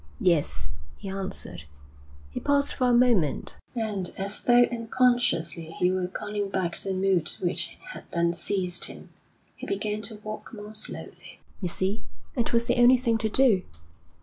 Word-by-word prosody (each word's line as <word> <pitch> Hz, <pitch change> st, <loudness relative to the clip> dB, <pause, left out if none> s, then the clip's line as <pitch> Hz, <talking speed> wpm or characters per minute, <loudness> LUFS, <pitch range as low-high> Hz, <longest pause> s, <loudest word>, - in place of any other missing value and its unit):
'Yes,' 145 Hz, -, +1 dB, 0.3 s
he 195 Hz, -, -7 dB
answered. 190 Hz, -, -4 dB, 0.7 s
He -, -, -4 dB
paused 285 Hz, 0 st, +2 dB
for 255 Hz, -, +1 dB
a -, -, +4 dB
moment, 240 Hz, -, +3 dB, 0.2 s
and, 210 Hz, -6 st, -2 dB
as 195 Hz, +2 st, +1 dB
though 245 Hz, 0 st, +6 dB
unconsciously 230 Hz, -9 st, +1 dB
he 180 Hz, 0 st, +3 dB
were 185 Hz, -1 st, 0 dB
calling 205 Hz, +2 st, -3 dB
back 185 Hz, -3 st, -1 dB
the 195 Hz, -1 st, -2 dB
mood 185 Hz, -3 st, +2 dB
which 175 Hz, -1 st, -2 dB, 0.2 s
had -, -, -9 dB
then 170 Hz, 0 st, +1 dB
seized 180 Hz, -1 st, 0 dB
him, -, -, -10 dB, 0.4 s
he -, -, -8 dB
began 210 Hz, +1 st, -2 dB
to 220 Hz, 0 st, -2 dB
walk 215 Hz, +2 st, -7 dB
more 210 Hz, 0 st, -9 dB
slowly. 215 Hz, -, -3 dB, 0.2 s
'You 180 Hz, -, 0 dB
see, 190 Hz, +5 st, -1 dB, 0.3 s
it 240 Hz, -3 st, 0 dB
was 235 Hz, 0 st, +2 dB
the 240 Hz, -, +1 dB
only 250 Hz, +1 st, +8 dB
thing 230 Hz, -2 st, +1 dB
to 220 Hz, -, 0 dB
do. 230 Hz, -5 st, +4 dB
200 Hz, 160 wpm, -27 LUFS, 180-235 Hz, 0.7 s, only